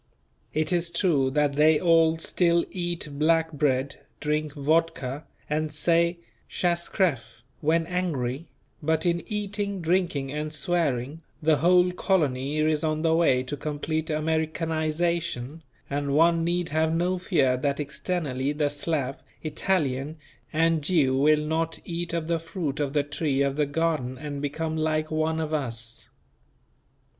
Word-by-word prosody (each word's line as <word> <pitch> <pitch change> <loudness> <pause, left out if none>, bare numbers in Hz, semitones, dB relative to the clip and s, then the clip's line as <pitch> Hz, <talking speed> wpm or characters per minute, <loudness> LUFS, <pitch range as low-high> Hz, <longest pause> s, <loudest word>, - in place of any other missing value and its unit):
It 155 +3 0
is 170 -1 +1
true 170 -6 +2
that 145 +1 +1
they 150 +1 +4
all 165 -2 +4
still 170 +1 +2
eat 175 -3 -3
black 160 +1 +3
bread, 140 -2 0 0.2
drink 150 0 -1
vodka, 150 -2 0 0.2
and 155 0 -1
say: 170 +3 +2 0.3
"Pshas 170 -1 0
creff" 145 - -1 0.2
when 165 +2 +2
angry; 165 -6 -2 0.3
but 160 +2 0
in 170 -1 +1
eating, 205 -1 -3
drinking 170 -5 0
and 150 +1 -3
swearing, 150 -2 -1 0.2
the 155 -1 +3
whole 180 +3 +4
colony 150 -7 0
is 155 0 +1
on 155 0 0
the 165 -1 +3
way 150 -6 +3
to 130 +3 -4
complete 155 +2 -3
Americanization, 160 -1 -1 0.3
and 140 0 -1
one 165 +1 +4
need 175 0 0
have 160 +1 +1
no 180 +2 0
fear 140 -9 +2
that 140 +2 -1
externally 145 -3 -2
the 150 -1 +1
Slav, 145 -2 -2 0.2
Italian 155 -3 -1 0.3
and 165 0 +2
Jew 145 -6 +3
will 150 +2 +3
not 160 +1 -1
"eat 170 0 -4
of 165 -1 -2
the 165 -1 +1
fruit 160 -3 -4
of 140 -2 -1
the 145 -2 +2
tree 145 -1 0
of 140 -1 0
the 150 -1 +1
garden 145 -4 -1
and 145 -1 -5
become 155 +2 -2
like 155 0 0
one 155 +1 0
of 155 -1 -3
us." 120 -5 -4
155 Hz, 145 wpm, -26 LUFS, 145-170 Hz, 0.3 s, they